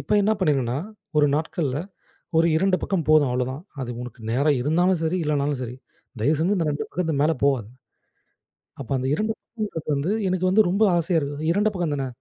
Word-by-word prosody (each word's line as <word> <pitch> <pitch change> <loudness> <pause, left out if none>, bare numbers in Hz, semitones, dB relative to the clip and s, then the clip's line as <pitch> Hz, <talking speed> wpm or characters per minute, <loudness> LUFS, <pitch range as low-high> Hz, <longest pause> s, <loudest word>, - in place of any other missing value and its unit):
இப்போ - - -1
என்ன 215 - +3
பண்ணியிருங்கன்னா, 135 -7 +1 0.4
ஒரு 150 -1 +5
நாட்கள்ல 150 -3 -1 0.6
ஒரு 165 - +5 0.2
2 195 -1 +3
பக்கம் 180 -6 -1
போதும் 155 -4 +5
அவ்ளோதான். 130 +4 -2 0.2
அது 125 -2 -4
உனக்கு 125 0 -9
நேரம் 140 +5 +2
இருந்தாலும் 175 +5 +2
சரி, 160 +3 0
இல்லனாலும் 145 -2 0
சரி. 125 +1 -6 0.5
தயவுசெஞ்சு 160 - +2
இந்த 165 -4 0
2 145 - -2
பக்கத்துக்கு 160 -5 -1
மேலே 160 +2 +3
போவாது. 130 -7 +1 1.1
அப்ப 130 - -8
அந்த 130 - -2
2 215 +1 0
பக்கம்ன்றது 210 -9 -6
வந்து, 145 +7 -1 0.2
எனக்கு 185 0 +1
வந்து 210 +2 +5
ரொம்ப 200 +4 +1
ஆசையா 170 0 +1
இருக்குது. 145 +3 -1
2 210 +1 +2
பக்கம் 170 -5 -1
தான, 135 -1 -2
155 Hz, 175 wpm, -24 LUFS, 140-180 Hz, 1.1 s, ஒரு